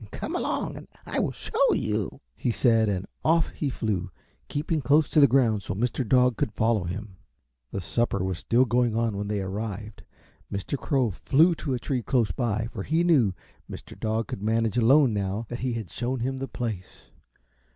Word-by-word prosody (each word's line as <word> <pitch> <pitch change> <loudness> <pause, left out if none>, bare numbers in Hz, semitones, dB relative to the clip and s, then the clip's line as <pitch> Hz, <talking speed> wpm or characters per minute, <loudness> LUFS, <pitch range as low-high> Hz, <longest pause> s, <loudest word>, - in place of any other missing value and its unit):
"Come - - -5
along - - -2
and - - -11 0.2
I - - -2
will - - 0
show - - +1
you," - - -2
he - - -2
said, 115 -2 +3
and 95 -1 -2 0.2
off 165 +1 +3
he 145 - -3
flew, 100 -7 -2 0.4
keeping 155 +1 -1
close 145 +4 +4
to - - +3
the 140 - +8
ground 120 -5 +3
so 100 - -4
Mr. 120 +5 -1
Dog 125 0 +3
could 110 - -1
follow 110 -4 +1
him. 95 +2 -6 0.5
The 100 - -4
supper 100 0 0
was 95 -2 -2
still 125 +3 +3
going 120 -1 +1
on 115 -2 0
when 100 +1 -3
they 105 -1 -1
arrived; 105 +2 -5 0.5
Mr. 100 +7 -3
Crow 130 -4 0
flew 155 - +3
to 145 -5 -3
a - - -3
tree 125 +1 -2
close 120 -2 +1
by, 115 -3 -1
for 110 - -5
he 160 - +1
knew 130 - +3 0.3
Mr. - - -9
Dog 110 0 -2
could - - -5
manage 115 +1 +1
alone 125 +2 +5
now 100 +2 -2
that 120 - -5
he 130 -1 -1
had 110 -6 -5
shown 125 +1 -2
him 135 +2 -1
the 135 +1 -4
place. 110 -9 -6
115 Hz, 195 wpm, -26 LUFS, 105-130 Hz, 0.5 s, the